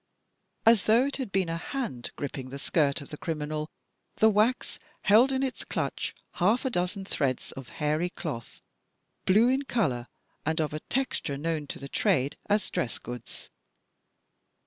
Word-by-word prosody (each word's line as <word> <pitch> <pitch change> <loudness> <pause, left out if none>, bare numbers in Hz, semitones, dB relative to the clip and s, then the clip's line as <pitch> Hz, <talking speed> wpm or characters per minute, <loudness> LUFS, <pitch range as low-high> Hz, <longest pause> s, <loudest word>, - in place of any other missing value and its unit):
As 225 -4 +6
though 230 +4 +5
it 280 - -2
had 260 -7 -4
been 190 -2 +2
a 165 0 -1
hand 195 - -4
gripping 135 -2 -5
the 135 - -6
skirt 140 -1 +1
of 140 - -10
the 150 - -7
criminal, 155 -1 -3 0.5
that 220 - +6
wax 215 +5 +2 0.2
held 230 +6 +6
in 265 0 +1
its 265 - -2
clutch, - - -2 0.3
half 215 +9 +4
a 260 - +1
dozen 180 0 -1
threads 140 -8 -1
of 135 -2 -9
a - - -15
hairy 155 +3 0
cloth, 145 - -6 0.6
blue 215 +5 +6
in 265 +2 +3
color, 140 - 0 0.4
and 160 +2 0
of 155 -2 0
a 155 - -2
texture 245 - -1
known 155 0 -2
to - - -5
the 140 - -7
trade 135 0 +2
as 205 -2 +2
dress 120 - -1
goods. 120 -1 -8
165 Hz, 170 wpm, -28 LUFS, 140-220 Hz, 0.6 s, As